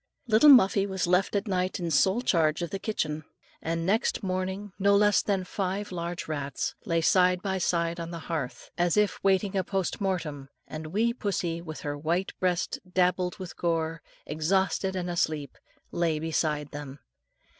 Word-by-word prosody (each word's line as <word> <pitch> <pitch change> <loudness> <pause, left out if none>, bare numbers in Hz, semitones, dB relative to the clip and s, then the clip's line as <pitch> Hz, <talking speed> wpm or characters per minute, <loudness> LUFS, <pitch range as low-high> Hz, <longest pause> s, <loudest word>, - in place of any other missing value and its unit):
Little 230 +5 +6
Muffie 200 -6 +6
was 190 -2 -1
left 180 +2 +2
that 200 +1 -1
night 185 -1 -1
in 170 -2 -2
sole 195 +9 +3
charge 160 -5 +2
of 170 - -4
the 195 - -3
kitchen, 155 -8 -2 0.4
and 165 +1 -2
next 215 +4 +1
morning, 190 +1 -3
no 200 +1 +4
less 205 0 +4
than 195 -3 0
five 195 +2 -3
large 175 0 -4
rats, 140 -3 -3
lay 165 0 +2
side 180 +1 +3
by 190 -2 -1
side 170 -1 0
on 165 0 -5
the 170 - -6
hearth, 155 -7 -4
as 175 0 +2
if 210 -1 +1
waiting 195 0 +2
a 190 - +2
post 190 +2 -2
mortem, 155 -8 -2 0.2
and 155 0 -6
wee 220 +8 +1
pussie, 180 -7 -2
with 155 -2 -8
her 145 0 -3
white 165 +6 -1
breast 180 -2 0
dabbled 180 -1 +1
in 185 - -4
gore, 165 -1 -1 0.2
exhausted 190 +5 0
and 180 -1 -2
asleep, 155 -5 -1 0.4
lay 165 -2 0
beside 155 -2 -1
them. 145 -2 -7
180 Hz, 170 wpm, -28 LUFS, 165-195 Hz, 0.4 s, Little